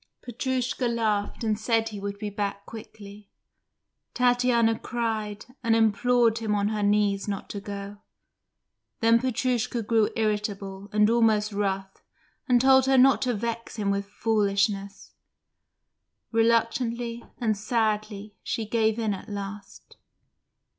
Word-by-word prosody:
Petrushka 255 0 -2
laughed 220 -2 -1
and 215 -2 0
said 225 0 +1
he 210 -2 -7
would 200 0 -5
be 210 0 -5
back 200 0 -3
quickly. 210 -2 -11 0.9
Tatiana 245 -2 +3
cried, 220 -3 -3 0.2
and 230 -1 +3
implored 230 +1 +3
him 215 -2 -1
on 205 0 +1
her 215 -1 -2
knees 205 -1 +1
not 200 -2 -4
to 205 - -5
go. 200 0 -7 1.0
Then 230 0 +5
Petrushka 245 -2 -1
grew 220 0 +2
irritable 205 -3 -2
and 210 0 +4
almost 220 -2 +2
rough, 195 -1 -3 0.5
and 245 -1 +5
told 265 +1 +5
her 265 0 +4
not 265 +1 +5
to 250 -2 0
vex 230 +2 -4
him 205 -3 -1
with 200 0 -2
foolishness. 200 -2 -1 1.2
Reluctantly 230 +1 +1
and 220 -3 0
sadly 215 -1 -2
she 225 - -3
gave 220 0 +1
in 220 -3 0
at 195 - -8
last. 200 0 -8
215 Hz, 125 wpm, -26 LUFS, 205-235 Hz, 1.2 s, Then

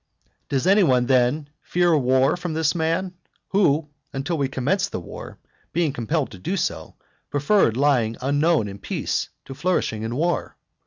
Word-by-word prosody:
VII. - - -40 0.2
Does 135 +1 0
any 195 +3 +5
one 125 -8 +3
then 130 +4 +2
fear 175 -1 +2
war 130 -1 +3
from 175 -2 -4
this 160 -2 +2
man, 170 +3 -1 0.4
who, 160 -6 +2 0.2
until 135 +6 -2
we 140 -3 0
commenced 185 +10 0
the - - -3
war, 85 - -9 0.4
being 165 -4 +1
compelled 140 +5 -1
to 95 - -10
do 185 - -2
so, - - -3 0.3
preferred 145 - +2
lying 125 -6 +2
unknown 145 -1 +2
in 100 0 -8
peace - - -2 0.2
to 135 - -8
flourishing 135 -8 -1
in 115 +2 -3
war? 170 +5 -1
145 Hz, 165 wpm, -23 LUFS, 125-170 Hz, 0.4 s, any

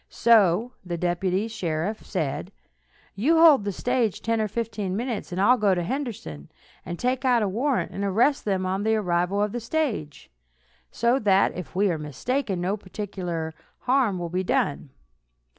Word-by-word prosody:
So 225 -1 +4
the 175 -2 -4
deputy 180 +4 0
sheriff 190 -1 -3
said: 155 -8 -3 0.6
"You 285 +12 +2
hold 310 -10 +7
the 200 - -1
stage 240 0 -1
ten 230 -1 +1
or 215 - 0
fifteen 210 -3 -3
minutes, 235 -4 -4
and 180 - -3
I'll 245 +6 +4
go 200 -3 +3
to 175 - -1
Henderson, 190 - -5 0.3
and 175 - -6
take 255 +4 -1
out 245 -4 +3
a - - +1
warrant, 250 +7 0
and 200 - -4
arrest 230 +9 +2
them 190 -3 -1
on 190 +1 -1
the 220 +1 +2
arrival 185 0 0
of 210 - -1
the 240 - -3
stage; 230 - -3 0.6
so 240 +3 +1
that, 195 -4 +3
if 175 -3 -8
we 200 0 +2
are 160 - -2
mistaken, 190 - -2
no 185 +4 -1
particular 180 -5 -5 0.3
harm 250 -7 +2
will 175 -1 -4
be 180 +2 -1
done." 145 -5 -1
200 Hz, 170 wpm, -25 LUFS, 180-235 Hz, 0.6 s, hold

